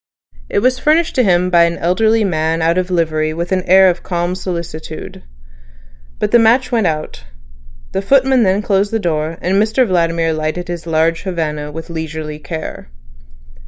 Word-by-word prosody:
It 200 - 0
was 255 0 +2
furnished 320 +4 +2
to 255 - +2
him 180 -2 +2
by 170 -1 +5
an 170 0 -2
elderly 220 +6 +2
man 160 -3 0
out 170 +2 +2
of 185 0 -3
livery 155 -3 0
with 170 +2 -4
an 185 -1 +1
air 190 +1 +7
of 175 -1 0
calm 175 0 -2
solicitude. 170 -4 -6 1.0
But - - -2
the 240 - +6
match 235 +4 +3
went 225 -6 +2
out; 155 - -4 0.7
the 195 - -2
footman 265 +3 +3
then 195 0 +2
closed 200 0 +1
the 225 - +1
door, 165 -4 -2
and 190 +3 +2
Mr 225 +4 +2
Vladimir 165 -4 0
lighted 155 +3 -3
his 170 -1 -6
large 165 +1 +1
Havana 150 -5 -3
with 160 +2 -8
leisurely 160 -2 -5
care. 155 - -7
175 Hz, 170 wpm, -16 LUFS, 160-200 Hz, 1.0 s, air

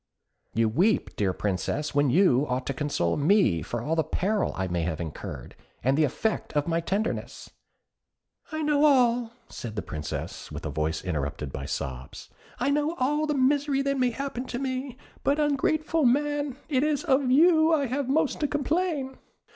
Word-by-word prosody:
"You 115 0 +3
weep, 180 - +1
dear 100 -3 +1
Princess, 105 +11 -2
when 145 -1 +3
you 145 -3 +4
ought 125 +1 -1
to 140 - -2
console 130 - -1
me 145 - +3
for 120 +9 -4
all 160 +4 0
the 160 - +2
peril 195 +7 0
I 95 0 -2
may 85 -1 -1
have 80 -1 -2
incurred, 80 -3 -7 0.3
as 130 +3 +3
the 155 +2 +3
effect 215 - -2
of 145 0 0
my 165 0 +1
tenderness." 200 +6 -3 1.0
"I 315 0 -2
know 295 -1 +2
all," 245 -5 +4 0.2
said 115 -3 -7
the 105 - -3
Princess, 75 -2 -6
with - - -7
a - - -3
voice 80 +1 -2
interrupted 75 -4 -3
by 70 - -5
sobs 65 -1 -6 0.3
"I 275 +3 +1
know 295 +3 0
all 295 +3 0
the 300 - 0
misery 275 +1 +2
that 275 -1 0
may 250 -1 +3
happen 265 0 -4
to 245 - -4
me; 260 -1 -3 0.3
but, 285 +2 +2
ungrateful 305 +2 +1
man! 290 +1 +1
it 265 -4 +1
is 300 0 +1
of 270 -5 +2
you 320 +3 +5
I 300 -4 +3
have 260 +1 -2
most 295 +1 +1
to 295 - +1
complain." 295 -2 -1
245 Hz, 180 wpm, -27 LUFS, -, 1.0 s, you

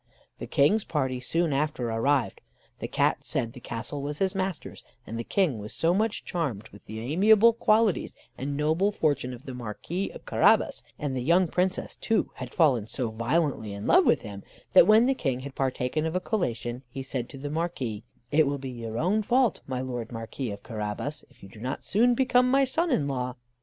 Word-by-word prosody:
The - - -6
King's 200 +10 +3
party 130 -5 -1
soon 160 +5 0
after 135 -4 -1
arrived. 115 -1 +1 0.4
The - - -4
Cat - - +1
said 115 -1 -2
the - - -10
castle 120 +4 -5
was 145 +1 -4
his 190 +2 +1
master's; 190 -3 -4 0.2
and 115 - -7
the 115 - -3
King 155 - +1
was 105 +1 -7
so 165 +1 +2
much 215 +3 0
charmed 130 - -3
with 100 - -16
the 110 +1 -7
amiable 205 - +5
qualities 220 -3 +2 0.2
and 140 +2 -4
noble 160 +7 +2
fortune 145 -9 0
of 125 +3 -10
the 130 - -6
Marquis 125 - -4
of - - -12
Carabas, - - +3 0.2
and 145 -3 -3
the 130 - -1
young 170 +7 +3
Princess 185 +3 -1
too 225 - 0
had - - -6
fallen 130 - +3
so 120 -1 -2
violently 115 -1 0
in 100 +1 -6
love - - +5
with - - +4
him, 100 -1 -8 0.3
that - - +8
when 215 +2 +6
the 270 - +3
King 135 - -2
had 140 +1 -7
partaken 135 +4 -1
of 160 - -4
a - - +2
collation, 125 - -2
he 135 +2 -6
said 130 -2 -4
to - - -9
the 145 +2 -5
Marquis: 145 -10 -3 0.3
"It 155 0 +4
will 140 0 -1
be 135 -1 -6
your 115 -2 -6
own 190 - +2
fault, 245 +1 +2
my 130 -1 -2
Lord 120 -3 -5
Marquis 115 +2 -5
of 100 -1 -7
Carabas, 110 +6 -4
if - - -23
you 95 - -11
do 105 - -14
not 125 +4 -4
soon 240 +5 +3
become 250 0 +3
my 275 +1 +4
son 330 +6 +1
in 155 - +1
law." 125 -2 -2
140 Hz, 205 wpm, -27 LUFS, 120-185 Hz, 0.4 s, that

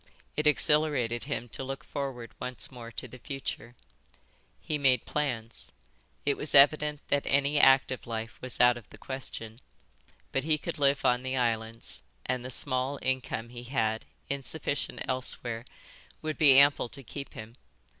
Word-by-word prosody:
It 150 0 +1
exhilarated 145 -6 +3
him 135 -4 -3
to 135 - -1
look 135 +1 -5
forward 130 -5 -5
once 125 +1 -4
more 120 -2 -8
to - - -5
the 125 +1 -12
future. 120 -3 -6 0.8
He 150 -1 -3
made 130 -4 +3
plans. 120 -6 -3 0.5
It 140 -1 +2
was 150 - -1
evident 150 +1 +6
that 145 - +1
any 140 +1 +3
active 135 -2 +5
life 115 -1 -5
was 130 -1 -5
out 125 0 +6
of 115 - -13
the - - -12
question, 120 -3 -7 0.7
but 135 - 0
he 155 0 +2
could 165 +1 -5
live 140 0 +3
on 125 0 +4
the 130 +1 -2
islands, 115 -2 -1 0.2
and 130 -1 -1
the 130 - -5
small 130 +2 -1
income 130 -3 -1
he 120 0 -9
had, 110 -4 0 0.2
insufficient 140 +1 -2
elsewhere, 120 -2 -2 0.6
would 155 0 -3
be 140 -4 +8
ample 140 -3 +6
to 135 +2 -6
keep 140 +3 -8
him. 110 +2 -9
130 Hz, 155 wpm, -29 LUFS, 120-140 Hz, 0.8 s, be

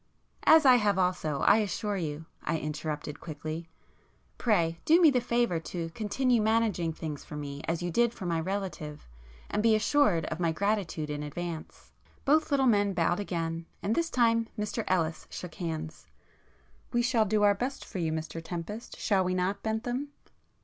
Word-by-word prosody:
"As 320 -1 +8
I 255 -2 +8
have 205 -4 +2
also, 180 -6 0
I 205 - +6
assure 210 0 -1
you,"—I 160 -1 -4
interrupted 150 -1 -4
quickly—"Pray 155 +1 -6 0.8
[p 180 -9 +3
48] 165 - -15
do 330 +3 +6
me 325 -4 +7
the 250 -2 +2
favour 235 -8 +1
to 165 0 -5
continue 235 +5 +1
managing 215 -6 +1
things 155 -2 -6
for 150 - -9
me 145 -1 -5
as 165 +1 -1
you 175 - -2
did 235 +6 +3
for 200 - -8
my 170 -2 0
relative, 180 - -4 0.4
and 210 - +1
be 225 0 +5
assured 210 - +3
of 160 - -4
my 170 -2 +2
gratitude 180 -5 -1
in 145 0 -3
advance." 160 +2 -6 0.3
Both 310 +3 +3
little 275 -2 +3
men 205 -4 +3
bowed 175 +1 +1
again, 165 -4 -3 0.2
and 210 - +1
this 335 +3 0
time 230 -3 +3
Mr 210 +2 -2
Ellis 165 -3 0
shook 180 -3 -7
hands. 160 -2 -5 0.8
"We 240 -1 +2
shall 235 -3 +3
do 210 +1 +1
our 205 0 +6
best 250 +7 -4
for 190 - -6
you, 165 -2 0
Mr 160 +1 -4
Tempest, 180 +7 -6
shall 195 -4 +2
we 185 0 0
not 185 +2 -1
Bentham?" 240 +5 -2
185 Hz, 175 wpm, -29 LUFS, 165-225 Hz, 0.8 s, As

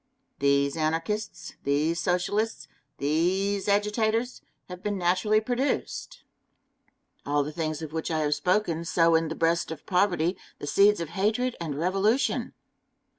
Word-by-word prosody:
These 140 +1 +2
Anarchists, 165 +7 -2
these 150 +4 +1
Socialists, 205 +5 -1 0.3
these 190 +7 0
agitators, 215 +4 +1 0.3
have 180 0 -9
been 205 0 -2
naturally 185 +4 +2
produced. 260 - -2 1.0
All 145 0 +1
the 150 - -5
things 155 -1 -3
of 155 -1 -7
which 160 -1 -3
I 160 -1 0
have 150 -1 +2
spoken 180 0 0
sow 165 0 +3
in 165 0 +3
the 160 - -4
breast 165 +1 +1
of 160 -2 -8
poverty 180 -2 +1 0.2
the - - -7
seeds 200 +5 +4
of 165 - -4
hatred 220 +7 0
and 155 -4 -3
revolution. 195 - +1
180 Hz, 135 wpm, -27 LUFS, 160-210 Hz, 1.0 s, seeds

